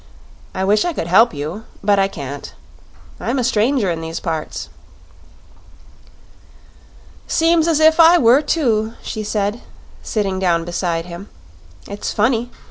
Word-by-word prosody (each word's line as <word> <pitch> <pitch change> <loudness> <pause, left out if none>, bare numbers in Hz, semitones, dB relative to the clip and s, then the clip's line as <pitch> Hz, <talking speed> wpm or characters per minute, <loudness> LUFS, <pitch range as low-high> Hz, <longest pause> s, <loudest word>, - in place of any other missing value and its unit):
"I 190 - -1
wish 205 +2 +3
I 350 - -1
could 165 - -3
help 195 +8 +5
you; 155 +9 -6 0.2
but 200 0 +3
I 195 - +3
can't. 140 -6 -8 0.6
I'm - - -2
a 255 - 0
stranger 230 -3 +1
in 165 -1 -4
these 165 0 -5
parts." 160 -3 -4 2.6
"Seems 330 0 +2
as 325 -2 +2
if 315 +1 +4
I 335 +2 +8
were, 250 -1 +5
too," 230 -8 0
she 215 - -5
said, 210 +2 -2 0.4
sitting 195 -3 -2
down 170 -3 +1
beside 170 -1 -2
him. 175 +3 -9 0.6
"It's 200 0 -5
funny. 230 +2 0
210 Hz, 135 wpm, -18 LUFS, 175-250 Hz, 2.6 s, I